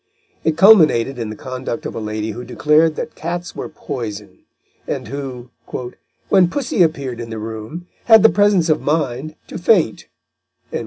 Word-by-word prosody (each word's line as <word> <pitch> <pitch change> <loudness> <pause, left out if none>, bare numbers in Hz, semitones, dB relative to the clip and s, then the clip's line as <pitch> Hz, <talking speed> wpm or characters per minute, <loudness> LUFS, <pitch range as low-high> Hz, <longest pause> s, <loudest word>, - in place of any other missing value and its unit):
It 160 -1 0
culminated 155 - +5
in 115 -2 -3
the 110 - -6
conduct 130 -1 -6
of - - -4
a - - -5
lady 110 0 -3
who 120 +4 -7
declared 155 +4 +2
that 155 - -5
cats 175 +2 -5
were - - -5
poison, 105 -8 -7 0.5
and - - -4
who, 130 -2 -6 0.8
"when 185 -3 +5
pussy 250 -4 -1
appeared 140 -7 0
in 115 -1 -6
the 110 - -5
room, 110 +10 -7 0.2
had 225 -3 +7
the 225 - +8
presence 205 -4 +3
of 155 -1 +2
mind 150 -1 -1
to - - -8
faint." 175 - +2
145 Hz, 160 wpm, -19 LUFS, 115-170 Hz, 0.8 s, the